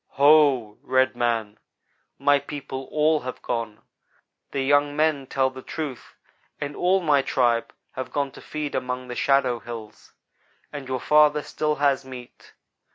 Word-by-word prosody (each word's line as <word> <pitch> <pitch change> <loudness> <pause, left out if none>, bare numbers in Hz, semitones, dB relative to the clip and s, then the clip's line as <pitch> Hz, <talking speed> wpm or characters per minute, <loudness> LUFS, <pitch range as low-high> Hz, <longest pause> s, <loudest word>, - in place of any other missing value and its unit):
"Ho! 140 -7 +4
red 130 0 +2
man 115 -3 -1 0.6
my 145 0 +3
people 135 -2 -7
all 155 +2 +2
have 130 -2 -7
gone. 115 -2 -4 0.7
The 135 - -2
young 145 +1 +2
men 150 -3 +1
tell 130 0 +1
the 130 0 -10
truth 150 -3 -6 0.4
and 145 0 -4
all 185 +2 +2
my 150 -5 +3
tribe 120 -3 +1 0.2
have 130 -1 -6
gone 140 -1 -1
to - - -13
feed 150 -1 -5
among 125 0 -3
the 125 - -5
shadow 130 -3 +2
hills, 115 -2 -10 0.6
and 140 -3 -7
your 130 -1 -2
father 150 +1 +4
still 150 0 -1
has 140 -2 +1
meat. 130 -2 -12
135 Hz, 150 wpm, -24 LUFS, 125-145 Hz, 0.7 s, Ho